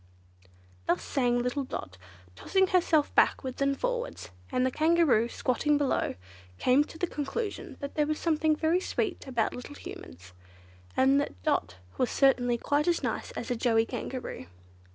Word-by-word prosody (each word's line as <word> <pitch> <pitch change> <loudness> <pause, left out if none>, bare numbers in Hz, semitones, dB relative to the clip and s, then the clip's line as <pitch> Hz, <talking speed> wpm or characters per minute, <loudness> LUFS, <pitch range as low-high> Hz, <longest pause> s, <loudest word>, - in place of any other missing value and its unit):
Thus 180 - +1
sang 245 -3 +1
little 250 +3 -1
Dot, 95 - -6 0.4
tossing 380 - +2
herself 340 -5 +2
backwards 260 0 +2
and 275 0 +1
forwards, - - -3 0.2
and 255 0 +2
the 260 - +1
Kangaroo, 310 -7 +3
squatting 290 +5 +1
below, 285 -2 0 0.4
came 255 - +4
to 320 - -12
the 355 - 0
conclusion 345 +8 -4
that 280 - -5
there 300 -2 +1
was 310 0 -1
something 315 -1 +2
very 320 +3 +2
sweet 375 -3 -2
about 235 -4 0
little 250 +4 -8
Humans, 90 - -10 0.6
and 270 +2 +5
that 95 - -5
Dot - - 0 0.2
was 255 - +2
certainly 245 -3 +3
quite 290 +5 0
as 345 -1 +1
nice - - -2
as - - -5
a - - +1
Joey 225 -1 +2
Kangaroo. 250 - -6
275 Hz, 155 wpm, -29 LUFS, 245-315 Hz, 0.6 s, and